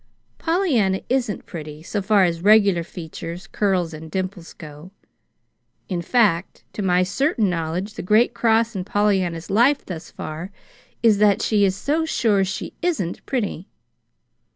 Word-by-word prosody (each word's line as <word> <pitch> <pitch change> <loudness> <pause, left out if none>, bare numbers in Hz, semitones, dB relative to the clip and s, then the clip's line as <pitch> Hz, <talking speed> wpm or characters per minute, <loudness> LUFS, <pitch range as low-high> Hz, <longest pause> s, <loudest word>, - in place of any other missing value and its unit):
Pollyanna 280 - +1
isn't 245 -5 -1
pretty, 155 -3 -8
so 205 +4 -3
far 200 0 +4
as 170 -2 0
regular 200 -3 +5
features, 170 +1 -8
curls, 185 -5 0
and 155 +1 -9
dimples 185 0 -4
go. 150 +2 -11 1.0
In 180 -3 -2
fact, 190 -3 +1
to - - -4
my 180 -2 +3
certain 215 - +1
knowledge 175 +5 -3
the - - -6
great 215 +6 +3
cross 230 0 +2
in 185 - -2
Pollyanna's 190 -4 0
life 250 +8 +3
thus 165 -3 -7
far 155 +4 -7 0.5
is 215 -3 +5
that 210 -2 +4
she 210 -2 +2
is 190 -1 +2
so 300 +10 0
sure 220 -10 +2
she 190 +1 -4
isn't 300 - -2
pretty. 205 - -3
195 Hz, 145 wpm, -22 LUFS, 170-220 Hz, 1.0 s, regular